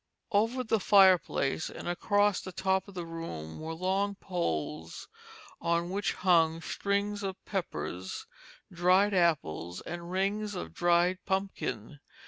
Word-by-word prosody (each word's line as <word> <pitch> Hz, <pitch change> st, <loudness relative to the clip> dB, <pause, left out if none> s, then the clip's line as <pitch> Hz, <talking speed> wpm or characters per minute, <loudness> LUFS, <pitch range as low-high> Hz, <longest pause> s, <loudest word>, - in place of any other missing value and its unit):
Over 225 Hz, +5 st, +2 dB
the 225 Hz, -2 st, +1 dB
fireplace 185 Hz, -7 st, +4 dB
and -, -, -8 dB
across 205 Hz, +2 st, +2 dB
the 185 Hz, -, -7 dB
top 190 Hz, +1 st, 0 dB
of 200 Hz, -, -12 dB
the 175 Hz, -2 st, -4 dB
room 165 Hz, -, -6 dB
were 160 Hz, +1 st, -5 dB
long 195 Hz, +3 st, 0 dB
poles 80 Hz, -, -3 dB, 0.5 s
on 170 Hz, +1 st, 0 dB
which 200 Hz, +1 st, 0 dB
hung 165 Hz, -3 st, +3 dB
strings 200 Hz, +4 st, -1 dB
of 195 Hz, -2 st, -3 dB
peppers, 90 Hz, -, -4 dB, 0.5 s
dried 185 Hz, +4 st, +4 dB
apples, 140 Hz, -, +1 dB
and 170 Hz, 0 st, -7 dB
rings 200 Hz, +3 st, -1 dB
of 180 Hz, -, -6 dB
dried 175 Hz, +1 st, +3 dB
pumpkin. 155 Hz, -, -3 dB
180 Hz, 125 wpm, -30 LUFS, 160-200 Hz, 0.5 s, fireplace